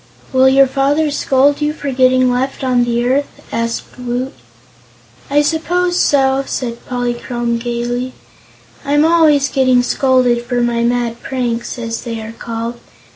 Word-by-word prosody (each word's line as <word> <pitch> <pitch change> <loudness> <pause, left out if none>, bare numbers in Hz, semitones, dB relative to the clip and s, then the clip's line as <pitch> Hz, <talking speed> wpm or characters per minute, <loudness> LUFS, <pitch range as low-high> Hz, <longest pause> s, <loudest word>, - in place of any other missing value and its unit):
"Will 260 0 +5
your 270 +1 +6
father 285 +3 +1
scold 280 +1 +2
you 300 0 0
for 285 -3 -5
getting 255 0 +3
left 260 +2 -2
on 250 -2 +2
the 240 0 0
earth?" 280 +3 -1
asked 230 +2 -4
Woot. 250 +2 -3 1.0
"I 290 +1 +3
suppose 350 +3 0
so," 270 -1 +3
said 235 -2 -4
Polychrome 240 -1 -2
gaily; 240 +1 -3 0.7
"I'm 290 +2 +2
always 315 -4 +4
getting 255 -2 +2
scolded 250 -2 +2
for 245 0 -2
my 240 -1 0
mad 235 -1 -1
pranks, 240 -3 -3
as 230 -1 -4
they 230 -2 -5
are 220 0 -7
called. 230 +1 -5
255 Hz, 140 wpm, -16 LUFS, 240-275 Hz, 1.0 s, your